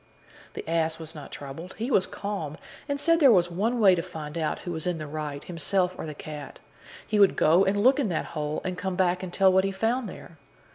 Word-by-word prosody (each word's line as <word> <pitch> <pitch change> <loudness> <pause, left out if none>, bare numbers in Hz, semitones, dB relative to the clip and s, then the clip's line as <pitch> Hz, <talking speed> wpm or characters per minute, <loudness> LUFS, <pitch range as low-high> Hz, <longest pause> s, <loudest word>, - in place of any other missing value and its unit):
The - - -7
ass 160 -1 0
was 160 0 -8
not 150 -3 -9
troubled; 145 +6 -8
he 235 +5 -3
was 190 -5 +3
calm, 195 -8 -5 0.3
and 280 0 -1
said 330 +2 +3
there 275 -5 +7
was 175 -4 +3
one 225 +8 0
way 195 -4 +7
to 175 - +1
find 160 -3 -8
out 160 -2 -1
who 175 - -5
was 160 0 -3
in 175 -2 0
the 155 - -5
right, 150 -1 -5
himself 180 +2 0
or - - -6
the 150 - -6
cat: 150 -1 -8 0.5
he 215 - 0
would 200 -1 +6
go 170 +5 +4
and 205 +1 +1
look 260 +3 +5
in 250 -8 +1
that 165 - -1
hole, 150 -1 -2
and 185 -1 -4
come 190 -1 -2
back 180 -1 +1
and 185 -2 -6
tell 190 0 +4
what 190 0 +4
he 195 - 0
found 225 +4 -1
there. 165 -3 -12
180 Hz, 240 wpm, -27 LUFS, 160-200 Hz, 0.5 s, there